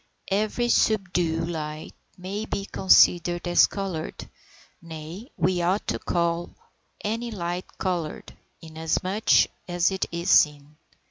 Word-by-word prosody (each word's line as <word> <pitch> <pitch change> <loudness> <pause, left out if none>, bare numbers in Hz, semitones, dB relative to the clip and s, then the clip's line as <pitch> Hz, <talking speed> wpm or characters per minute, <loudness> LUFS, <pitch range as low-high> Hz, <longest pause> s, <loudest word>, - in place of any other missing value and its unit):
Every 215 +4 0
subdued 180 -8 +1
light 155 -2 -5 0.2
may 195 +4 -5
be 200 -2 -3
considered 175 -3 +4
as 175 - +5
coloured, 190 -6 -5 0.5
nay, 165 - -9
we 180 +1 +1
ought 185 +4 0
to - - -1
call 170 0 -1 0.5
any 230 +3 -2
light 175 -4 -5
coloured, 175 -4 -3 0.3
inasmuch 160 +6 -3 0.4
as 175 +1 +1
it 190 - -2
is 170 +1 -1
seen. 150 -1 +3
175 Hz, 115 wpm, -25 LUFS, 165-195 Hz, 0.5 s, as